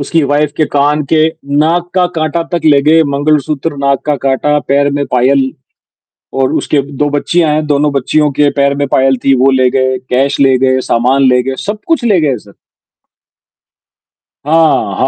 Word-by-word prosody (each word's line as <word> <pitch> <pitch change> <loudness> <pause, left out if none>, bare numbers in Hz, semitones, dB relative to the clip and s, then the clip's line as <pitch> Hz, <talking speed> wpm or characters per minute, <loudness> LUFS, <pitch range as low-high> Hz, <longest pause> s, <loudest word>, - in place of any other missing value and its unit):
उसकी 160 +3 0
वाइफ 145 +1 0
के 155 - +1
कान 145 +1 +1
के 155 -1 +4 0.3
नाक 170 +3 0
का 180 -1 +2
काँटा 160 +1 -1
तक 175 - 0
ले 145 -2 +4
गए, 160 +3 +4
मंगलसूत्र, 145 +1 -1
नाक 140 -1 -1
का 150 - 0
काँटा 150 +2 +1
पैर 140 +1 +2
में 145 0 -1
पायल 130 +2 +2 0.9
और 135 -1 0
उसके 145 - 0 0.2
2 145 - +1
बच्चियाँ 155 +2 0
हैं, 155 0 -1
दोनों 145 0 0
बच्चियों 145 +3 0
के 145 -1 +3
पैर 140 0 +1
में 140 0 -1
पायल 135 0 +2
थी 135 -1 +3
वो 135 - +4
ले 130 -1 +2
गए, 130 0 0
कैश 135 +3 0
ले 135 -2 +4
गए, 130 0 +1
सामान 125 +4 +2
ले 125 0 +2
गए, 130 +1 -4
सब-कुछ 220 +8 -2
ले 200 -7 +2
गए 140 -4 0
सर। 100 -1 -18 2.0
हाँ, 155 -11 +1
हाँ 130 - +1
145 Hz, 180 wpm, -12 LUFS, 135-155 Hz, 2.0 s, के